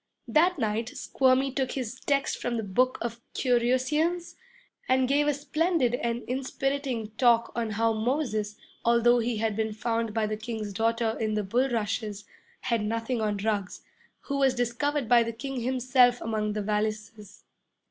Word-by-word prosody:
That 350 +3 +3
night 225 -1 -1
Squirmy 265 +1 +1
took 265 -1 -2
his 255 -2 -4
text 280 -1 0
from 240 -1 -1
the 225 - -2
book 250 +6 +1
of 235 0 -5
Currussians, 260 +8 +1 0.6
and 260 0 +3
gave 290 +2 +2
a 295 - +3
splendid 305 -2 +1
and 235 -1 -2
inspiriting 265 -3 -2
talk 235 -2 +4
on 230 -1 -2
how 225 +2 +1
Moses, 220 -3 -1 0.3
although 235 +1 +4
he 235 -1 -1
had 220 -1 -1
been 220 0 -1
found 230 +1 -1
by 220 0 0
the 215 0 -3
King's 220 -2 -5
daughter 225 +2 0
in 215 -1 -1
the 210 - 0
bulrushes, 220 -2 -1 0.4
had 230 -3 0
nothing 230 +2 -2
on 210 -1 0
Ruggs, 205 -2 -2 0.4
who 280 -1 -3
was 265 -2 +3
discovered 250 +3 -1
by 240 0 +6
the 230 0 -2
King 270 +3 -5
himself 250 0 +3
among 215 -2 -2
the 210 -1 -2
valises. 210 0 -3
235 Hz, 155 wpm, -27 LUFS, 220-260 Hz, 0.6 s, by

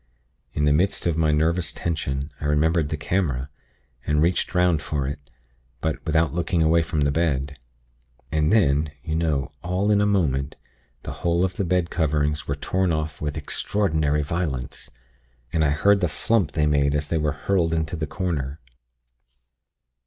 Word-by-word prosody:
In 75 - +1
the 75 - +4
midst 95 +7 +1
of 85 -2 +1
my 80 -1 +2
nervous 80 0 +1
tension 70 -3 -3
I - - -4
remembered 75 +1 +2
the 75 - -2
camera, 70 -6 -1 0.5
and 75 0 +1
reached 85 +3 +1
'round 90 -4 +3
for 70 -1 -2
it; 70 - -4 0.6
but 80 +2 -2
without 80 0 +2
looking 85 -1 +1
away 80 +1 +4
from 80 -2 -2
the 70 0 +2
bed. 70 -3 -1 0.7
And 75 0 +2
then, 75 -8 +3
you 80 - -3
know, 80 -4 0
all 95 +4 0
in 105 -1 +4
a 105 - +3
moment, 70 -9 0 0.5
the - - -5
whole 85 +1 +2
of 95 - -3
the 100 - -1
bed 90 -1 0
coverings 75 -2 0
were 70 - -1
torn 95 +5 0
off 80 -2 -3
with 75 0 -3
extraordinary 80 -2 0
violence, 70 -5 -3 0.6
and 80 - +2
I 75 - +3
heard 100 +8 +3
the 90 - +2
flump 90 +1 0
they 75 -1 +2
made 70 -1 +2
as 75 0 -1
they 80 - +1
were 75 -1 0
hurled 85 +2 0
into 80 +1 -1
the 80 -2 -3
corner. 75 -4 -3
80 Hz, 170 wpm, -24 LUFS, 75-85 Hz, 0.7 s, the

